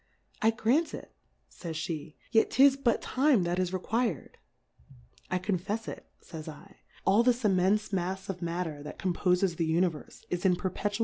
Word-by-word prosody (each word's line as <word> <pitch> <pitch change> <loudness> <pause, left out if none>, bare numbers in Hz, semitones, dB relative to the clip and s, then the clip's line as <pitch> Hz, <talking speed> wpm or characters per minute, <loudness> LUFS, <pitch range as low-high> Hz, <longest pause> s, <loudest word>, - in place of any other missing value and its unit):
I 220 - +5
grant 245 +8 +1
it, - - -11 0.3
fays 165 -3 -7
Jhe^ 155 -1 -4 0.2
yet 225 - +4
'tis 270 0 +6
but 260 -4 +1
Time, 260 -6 +3
that 175 +1 -1
is 185 -1 +1
requir'd. 200 - -2 0.9
I 185 - +1
confefs 200 +4 -2
it, - - -7 0.2
fays 155 -2 -8
7, 155 - -7 0.5
all 200 +4 +5
this 245 0 +2
immenfe 200 +1 +2
Mafs 190 +1 -2
of 190 -2 -5
Matter 170 -3 -3
that 150 - -8
compofes 180 -1 +1
the 165 -2 0
Univerfe, 170 -2 -1
is 175 0 -2
in 185 -2 +4
p<irpetua! 200 +4 -2
185 Hz, 165 wpm, -29 LUFS, 175-220 Hz, 0.9 s, tis